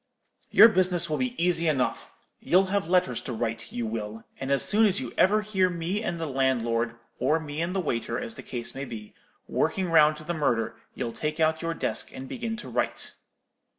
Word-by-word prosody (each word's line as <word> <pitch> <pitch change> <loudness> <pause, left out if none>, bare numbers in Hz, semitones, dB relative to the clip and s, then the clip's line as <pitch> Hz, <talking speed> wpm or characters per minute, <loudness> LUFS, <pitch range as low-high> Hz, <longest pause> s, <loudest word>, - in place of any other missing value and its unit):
Your - - +9
business 180 -5 +2
will 150 - 0
be 255 -1 -1
easy 170 -1 +2
enough. 135 -5 0 0.3
You'll 185 +3 +3
have 200 -4 0
letters 180 0 +2
to 125 - -5
write, 115 0 -3
you 120 -1 -3
will; 110 0 -5 0.2
and 135 - -4
as 140 0 +4
soon 215 +2 +4
as 200 0 0 0.2
ever 200 +3 +4
you - - +1
hear 190 -3 +2
me 175 +4 -2
and 175 -6 -3
the 165 - -2
landlord, 120 -4 0 0.2
or 150 +6 +2
me 150 0 -5
and 175 +3 -2
the - - +1
waiter, 120 -8 -2
as 240 -2 -5
the - - -9
case 120 -1 -5
may 135 +1 -5
be, 110 -4 -9 0.3
working 170 +3 0
round 155 -2 +5
to 155 - -10
the 175 - -3
murder, 120 -8 0 0.2
you'll 115 - -3
take 155 +1 -3
out 160 0 +2
your 165 0 -2
desk - - -1
and 130 - -7
begin 230 - -4
to 235 - -8
write.' - - -1
160 Hz, 210 wpm, -27 LUFS, 125-185 Hz, 0.3 s, Your